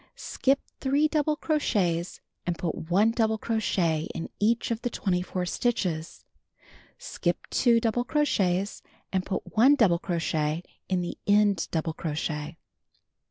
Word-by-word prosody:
Skip 275 +1 0 0.2
3 285 +3 +2
double 305 -1 +1
crochets 190 - 0 0.3
and 175 -1 0
put 160 -1 -4
1 205 +6 +4
double 220 -1 +1
crochet 180 -9 0
in 165 - -4
each 230 +3 +1
of 230 0 -2
the 245 - -1
24 180 -3 -1
stitches. 180 -7 -2 0.7
Skip - - -2
2 235 -2 +4
double 230 +1 0
crochets 205 - 0 0.3
and 190 -1 +1
put 195 - -5
1 260 +6 +6
double 190 -10 +3
crochet 160 -2 -1 0.3
in 185 -2 +1
the 175 - -5
end 205 -4 +3
double 160 -1 -1
crochet. 155 0 -4
195 Hz, 130 wpm, -27 LUFS, 170-235 Hz, 0.7 s, 1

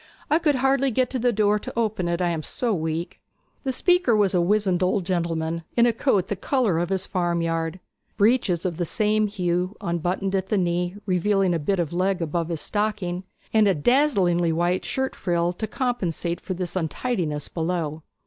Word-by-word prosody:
'I 310 - +5
could 305 -4 +2
hardly 270 +1 +2
get 255 +1 0
to 260 - -1
the 245 +1 +2
door 210 -1 +2
to - - -7
open 215 -6 0
it, 170 +1 -1
I 175 - +2
am 165 -2 -2
so 235 +8 -2
weak.' 160 0 -3 0.4
The 265 - 0
speaker 355 -3 +3
was 205 -3 +3
a 180 - +3
wizened 190 0 +2
old 185 0 +1
gentleman, 165 -2 -1 0.2
in 235 - +6
a 240 - +3
coat 205 -6 +1
the 205 - -2
colour 210 - +1
of 175 0 -1
his 190 -1 0
farmyard, 170 -1 -1 0.4
breeches 205 -5 +2
of 175 -3 -2
the 175 - 0
same 215 +3 +1
hue, 180 0 -1
unbuttoned 180 +2 -1
at 190 0 -1
the 210 - +2
knees, 175 +1 0
revealing 195 0 +2
a 170 - 0
bit 190 +6 0
of 170 -2 -1
leg 185 +1 +1
above 165 0 -2
his 165 -3 -1
stocking 200 -4 -2 0.3
and 215 -2 +5
a 195 - +3
dazzlingly 180 - +3
white 175 +3 0
shirt 265 0 -2
frill 175 -1 0
to 220 +5 -4
compensate 185 - -2
for 185 - -4
this 180 0 -4
untidiness 165 - -2
below. 160 -2 -2
185 Hz, 190 wpm, -24 LUFS, 170-215 Hz, 0.4 s, in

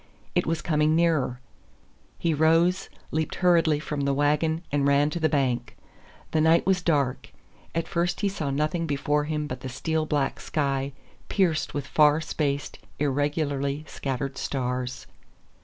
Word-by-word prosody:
It - - +1
was 165 0 -1
coming 155 -1 +2
nearer. 155 -7 +2 0.8
He 165 -1 0
rose, 165 +4 +3 0.2
leaped 155 0 -1
hurriedly 165 -4 +3
from 150 -1 -3
the 140 0 +1
wagon, 150 +3 +1
and 140 -1 +2
ran 140 +1 +3
to 170 - -3
the 160 -1 +2
bank. 125 -4 0 0.5
The 155 - +2
night 160 +2 +4
was 190 -1 +2
dark; 145 -7 0 0.4
at 165 0 -1
first 175 +2 -1
he 205 - +2
saw 170 -7 -2
nothing 155 +4 0
before 145 +1 0
him 150 0 -2
but 130 -3 -5
the 130 - -6
steel 155 +4 -1
black 145 -3 0
sky 140 -2 -1 0.4
pierced 175 -6 +1
with 145 - -2
far 150 0 +4
spaced, 145 -3 -2 0.2
irregularly 145 0 -1
scattered 135 0 -4
stars. 125 -2 -3
150 Hz, 150 wpm, -26 LUFS, 140-160 Hz, 0.8 s, night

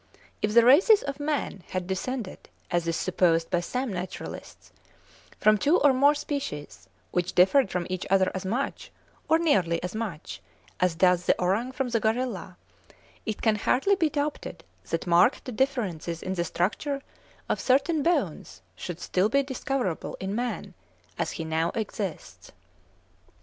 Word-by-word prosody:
If 210 +1 0
the 235 -1 +7
races 370 - +6
of 280 0 -5
man 290 -9 -2
had 185 -1 -3
descended, 200 +3 -4 0.2
as 175 -1 0
is 165 - 0
supposed 165 -1 +1
by 175 - +2
some 250 +6 -3
naturalists, 180 +1 -7 0.7
from 215 -1 +4
two 300 - +4
or 285 -2 +5
more 285 +3 +4
species, 150 - -5 0.2
which 180 +1 -1
differed 195 +6 +5
from 175 -1 -2
each 185 -1 -4
other 190 -1 +3
as 190 - -4
much, 230 +9 -3 0.4
or 320 - +6
nearly 195 - +2
as 180 - -4
much, 215 -8 -5 0.4
as 180 -2 +2
does 180 +1 +3
the - - +3
orang 200 +8 0
from 260 -1 -2
the 230 -1 +1
gorilla, 220 -5 -2 0.7
it 215 - -3
can 220 -2 +3
hardly 270 - +2
be 330 -5 +2
doubted 290 0 -3 0.3
that 165 - -2
marked 185 +8 +3
differences 190 - -1
in 185 - -2
the 170 -2 -1
structure 275 - -2 0.4
of - - -1
certain 280 +4 +2
bones 220 - -1 0.2
would 175 -1 -5
still 185 +3 +1
be 280 +4 +2
discoverable 265 - -3
in 190 +1 -3
man 240 +2 -3 0.5
as - - -1
he 165 - -5
now 160 +1 0
exists. 205 -5 -5
210 Hz, 155 wpm, -27 LUFS, 180-270 Hz, 0.7 s, the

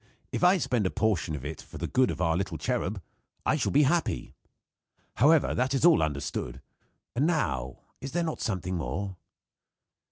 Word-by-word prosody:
If - - -2
I 180 +2 +6
spend 125 - +1
a - - 0
portion 95 -8 0
of 70 -2 -7
it 75 0 -5
for - - -11
the - - -3
good 130 0 +2
of - - -4
our 80 -2 +2
little 95 +3 -2
cherub, 110 -6 -2 0.4
I - - +3
shall - - 0
be 145 +2 +5
happy. 165 +5 0 0.8
However, 150 +5 +5
that 130 +2 0
is 135 - +2
all 170 -2 +6
understood. 75 -3 -3 0.6
And 140 +6 +2
now, 65 - -1 0.2
is 135 0 -5
there 175 +1 +1
not 160 -2 -3
something 95 -3 -2
more?" 90 +6 -4
110 Hz, 180 wpm, -28 LUFS, 85-145 Hz, 0.8 s, I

